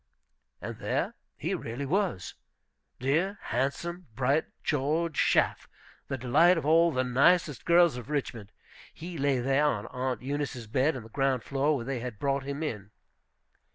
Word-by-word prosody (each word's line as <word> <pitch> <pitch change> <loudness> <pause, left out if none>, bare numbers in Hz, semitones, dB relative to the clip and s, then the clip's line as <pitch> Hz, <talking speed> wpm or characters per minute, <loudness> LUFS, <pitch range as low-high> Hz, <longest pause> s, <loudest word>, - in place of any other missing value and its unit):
And - - -6
there - - -1 0.2
he - - -2
really 120 +5 -4
was, 180 - -1 0.7
dear 165 +10 +1
handsome, 170 +6 -3
bright 135 +4 +2 0.2
George 155 +3 0
Schaff, - - +2 0.4
the 135 - -3
delight 155 +9 +4
of 160 - -3
all 165 +2 +5
the 130 -3 0
nicest 140 +2 +3
girls 170 -5 +5
of 125 +2 -8
Richmond; 120 -8 -3 0.4
he 170 -1 -8
lay 140 -1 +2
there 135 +4 +2
on 110 -8 0
Aunt 125 -2 -3
Eunice's 135 -3 -3
bed 135 +7 +1
on 125 - -6
the 110 - -13
ground 135 0 0
floor, 140 +2 +1
where 120 -4 -4
they 135 -1 -2
had 120 -3 -6
brought 140 +3 0
him 140 +3 -4
in. 105 -10 -4
140 Hz, 155 wpm, -29 LUFS, 125-160 Hz, 0.7 s, all